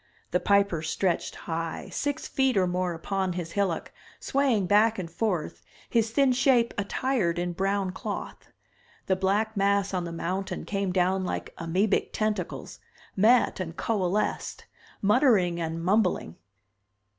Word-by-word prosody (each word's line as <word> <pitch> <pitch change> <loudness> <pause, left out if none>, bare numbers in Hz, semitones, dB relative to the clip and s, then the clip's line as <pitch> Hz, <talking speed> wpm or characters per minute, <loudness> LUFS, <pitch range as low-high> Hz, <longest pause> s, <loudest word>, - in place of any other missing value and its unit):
The 180 - +2
Piper 200 -5 +2
stretched 175 +3 -1
high, 165 -1 -4
six 285 -1 -2
feet 265 -4 +1
or 185 - +4
more, 180 -1 -1
upon 190 +2 -2
his 170 -2 -5
hillock, 195 -4 -1 0.3
swaying 265 -8 +1
back 215 +4 +4
and 185 -3 -4
forth, 180 -3 -2 0.3
his 230 -2 +2
thin 270 +3 +3
shape 250 -2 +3
attired 205 -3 0
in 175 0 -1
brown 195 +1 0
cloth. - - -6 0.6
The 190 - +2
black 205 +4 0
mass 200 0 +1
on 180 -2 -1
the 170 - -5
mountain 185 +3 -3
came 195 -2 -1
down 185 +1 +1
like 180 - -4
amoebic 185 +5 0
tentacles, 210 -5 -3 0.4
met 225 +4 +4
and 170 -2 -5
coalesced, 205 -2 -1 0.4
muttering 205 -7 +3
and 165 0 -3
mumbling. 185 - +1
195 Hz, 135 wpm, -27 LUFS, 175-215 Hz, 0.6 s, or